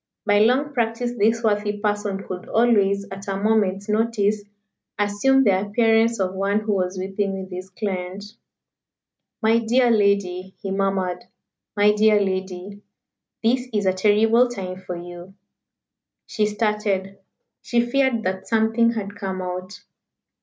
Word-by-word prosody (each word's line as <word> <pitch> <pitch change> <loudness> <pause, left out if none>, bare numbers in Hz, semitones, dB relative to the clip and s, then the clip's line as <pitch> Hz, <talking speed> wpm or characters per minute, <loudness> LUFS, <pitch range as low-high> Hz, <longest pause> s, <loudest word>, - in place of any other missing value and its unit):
By 205 -1 +4
long 260 +7 +2
practice 235 -1 -1
this 225 +2 +1
worthy 210 -1 0
person 205 -1 -2
could 180 -1 -7
always, 200 -4 +2
at 195 +1 -8
a 195 -1 -2
moment's 200 -2 +1
notice, 215 -1 +1 0.6
assume 205 +7 +2
the 195 -5 +3
appearance 225 +2 +2
of 185 -1 -1
one 200 +2 0
who 215 -1 -1
was 185 -1 -1
weeping 195 +1 -2
with 190 0 -8
his 185 +1 -7
client. 190 -1 -4 1.2
"My 225 +1 +4
dear 240 +2 +2
lady!" 200 -3 +1
he 195 - -5
murmured. 190 -2 -1 0.5
"My 205 +1 +5
dear 210 0 +4
lady! 190 0 -4 0.6
This 250 +3 +1
is 210 -2 -1
a 185 - +3
terrible 220 +5 +4
time 185 -5 -6
for 180 -1 -6
you." 175 +2 -10 0.9
She 210 -1 0
started. 210 -2 -1 0.4
She 240 - 0
feared 240 -1 +1
that 190 0 -3
something 225 +1 +2
had 205 -3 -5
come 190 -2 -4
out. 185 +2 -6
205 Hz, 140 wpm, -22 LUFS, 190-225 Hz, 1.2 s, My